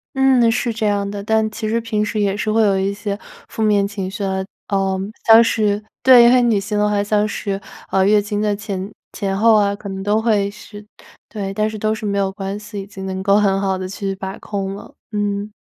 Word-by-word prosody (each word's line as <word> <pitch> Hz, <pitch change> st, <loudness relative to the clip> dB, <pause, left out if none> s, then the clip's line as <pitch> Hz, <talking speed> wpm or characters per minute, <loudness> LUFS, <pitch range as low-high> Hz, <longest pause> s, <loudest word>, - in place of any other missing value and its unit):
嗯， 260 Hz, -3 st, +4 dB
是 235 Hz, 0 st, -1 dB
这 220 Hz, -1 st, -2 dB
样 200 Hz, -1 st, 0 dB
的， 200 Hz, 0 st, -6 dB
但 220 Hz, 0 st, +1 dB
其 215 Hz, 0 st, -4 dB
实 230 Hz, +1 st, +1 dB
平 225 Hz, -2 st, -1 dB
时 210 Hz, +1 st, -2 dB
也 200 Hz, -1 st, +1 dB
是 215 Hz, +1 st, -1 dB
会 225 Hz, +1 st, +3 dB
有 200 Hz, -2 st, +3 dB
一 195 Hz, +1 st, 0 dB
些 200 Hz, 0 st, -4 dB, 0.3 s
负 225 Hz, -, -6 dB
面 205 Hz, -2 st, +3 dB
情 195 Hz, -2 st, -5 dB
绪 200 Hz, +1 st, -5 dB
啊， 190 Hz, 0 st, -1 dB, 0.2 s
呃， 195 Hz, -1 st, 0 dB, 0.3 s
像 225 Hz, +1 st, +8 dB
是 210 Hz, -2 st, 0 dB, 0.2 s
对， 250 Hz, -1 st, +7 dB
女 225 Hz, -4 st, +3 dB
性 205 Hz, +1 st, -3 dB
的 210 Hz, 0 st, +2 dB
话 205 Hz, -1 st, +1 dB
像 210 Hz, 0 st, +1 dB
是， 200 Hz, -2 st, -3 dB, 0.3 s
呃， 190 Hz, 0 st, +3 dB
月 205 Hz, +1 st, +4 dB
经 205 Hz, 0 st, -3 dB
的 210 Hz, -1 st, +1 dB
前 200 Hz, -1 st, -5 dB, 0.2 s
前 195 Hz, -2 st, -2 dB
后 225 Hz, +2 st, +5 dB
啊， 200 Hz, -1 st, +2 dB
可 200 Hz, 0 st, -9 dB
能 190 Hz, 0 st, -5 dB
都 210 Hz, +2 st, +1 dB
会 210 Hz, -3 st, +1 dB
是 205 Hz, 0 st, -12 dB, 0.4 s
对， 195 Hz, -3 st, -4 dB
但 215 Hz, +2 st, 0 dB
是 215 Hz, -, -7 dB
都 215 Hz, +1 st, 0 dB
是 220 Hz, 0 st, -6 dB
没 200 Hz, -1 st, -1 dB
有 195 Hz, -1 st, 0 dB
关 195 Hz, +1 st, -5 dB
系， 210 Hz, -1 st, -7 dB
已 195 Hz, -, -10 dB
经 195 Hz, -2 st, -8 dB
能 190 Hz, 0 st, -4 dB
够 200 Hz, +1 st, +3 dB
很 195 Hz, -2 st, +2 dB
好 190 Hz, -1 st, 0 dB
地 185 Hz, 0 st, -5 dB
去 195 Hz, 0 st, -4 dB
把 190 Hz, 0 st, -6 dB
控 195 Hz, -1 st, -4 dB
了。 200 Hz, -, -12 dB, 0.2 s
嗯。 205 Hz, 0 st, -2 dB
205 Hz, 250 characters per minute, -19 LUFS, 195-215 Hz, 0.4 s, 像